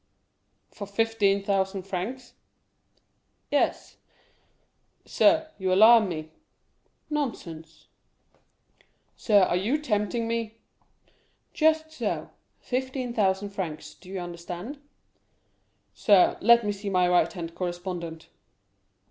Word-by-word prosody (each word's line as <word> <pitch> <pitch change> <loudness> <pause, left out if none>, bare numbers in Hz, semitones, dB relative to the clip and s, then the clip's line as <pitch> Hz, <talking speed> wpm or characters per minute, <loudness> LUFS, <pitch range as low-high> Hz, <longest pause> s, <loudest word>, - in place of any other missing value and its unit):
"For 200 - -8
fifteen 200 -2 +1
thousand 195 -1 -1
francs?" 205 +7 -5 1.2
"Yes." - - 0 1.1
"Sir, 315 0 +3
you 190 -1 -1
alarm 215 +2 +7
me." 155 -2 -6 0.8
"Nonsense." 170 - -5 1.3
"Sir, 205 -5 +3
you 200 +10 +1
are - - +2
tempting 230 -4 -1
me?" 230 -1 -3 1.0
"Just 315 0 +2
so; 315 - -4 0.3
fifteen 260 -1 -3
thousand 200 -2 0
francs, 175 -6 -6
do 185 - -17
you 190 0 -4
understand?" 175 - -7 1.1
"Sir, 200 -4 +4
let 235 +1 +5
me 205 - 0
see 200 0 -5
my 180 -2 +2
right 180 0 +3
hand 170 -2 -7
correspondent." 175 -2 -5
200 Hz, 95 wpm, -26 LUFS, 180-235 Hz, 1.3 s, alarm